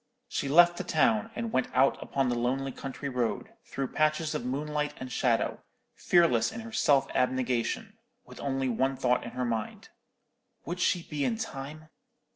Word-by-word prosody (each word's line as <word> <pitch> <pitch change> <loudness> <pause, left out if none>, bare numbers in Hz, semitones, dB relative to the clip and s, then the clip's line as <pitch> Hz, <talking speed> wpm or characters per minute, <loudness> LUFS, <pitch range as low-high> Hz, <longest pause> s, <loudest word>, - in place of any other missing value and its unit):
She 140 - -2
left 175 +3 +6
the - - -3
town, 115 - +2
and 230 -1 -3
went 130 - +2
out 135 +1 +3
upon 135 -1 0
the 125 - +1
lonely 130 +3 -1
country 135 +2 -6
road, 125 -4 -2
through 135 -2 -4
patches 155 0 +1
of - - -3
moonlight 150 +3 -2
and 130 -1 -7
shadow, 120 -4 +1 0.3
fearless 170 -10 +3
in 225 +1 -6
her 225 0 -9
self 145 -10 +3
abnegation, 130 - -1 0.3
with - - -13
only 135 -1 -1
one 130 +3 +1
thought 125 -1 +1
in - - -6
her 125 - 0
mind: 115 -2 -4 0.8
"Would 175 +2 -4
she 180 -1 +2
be 150 -3 -3
in 225 - 0
time?" 155 -6 -7
135 Hz, 170 wpm, -29 LUFS, 125-160 Hz, 0.8 s, left